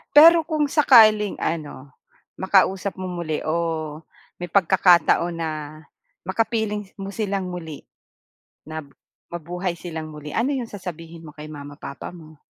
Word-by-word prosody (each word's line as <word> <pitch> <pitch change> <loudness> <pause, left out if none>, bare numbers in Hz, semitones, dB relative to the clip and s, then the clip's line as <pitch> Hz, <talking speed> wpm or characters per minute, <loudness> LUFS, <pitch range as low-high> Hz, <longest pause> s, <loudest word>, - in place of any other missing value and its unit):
Pero 330 +3 +9
kung 310 -2 0
sakaling 220 - +5
ano, 145 -4 -4 0.4
makausap 190 +1 +1
mo 185 - -5
muli 170 -4 -3
o 160 -2 -2 0.4
may 175 - -4
pagkakataon 175 -2 +4
na, 165 -1 -2 0.7
makapiling 210 0 -1
mo 195 0 -6
silang 200 -3 -2
muli, 165 -4 -7 0.8
na 160 0 -5 0.5
mabuhay 175 +1 -4
silang 160 -3 -6
muli. 150 -1 -9
Ano 245 +5 +1
'yong 255 -5 -3
sasabihin 170 -4 -8
mo 160 - -10
kay 150 0 -9
mama 145 -1 -10
papa 140 - -7
mo? 160 -4 -14
175 Hz, 130 wpm, -23 LUFS, 160-205 Hz, 0.8 s, Pero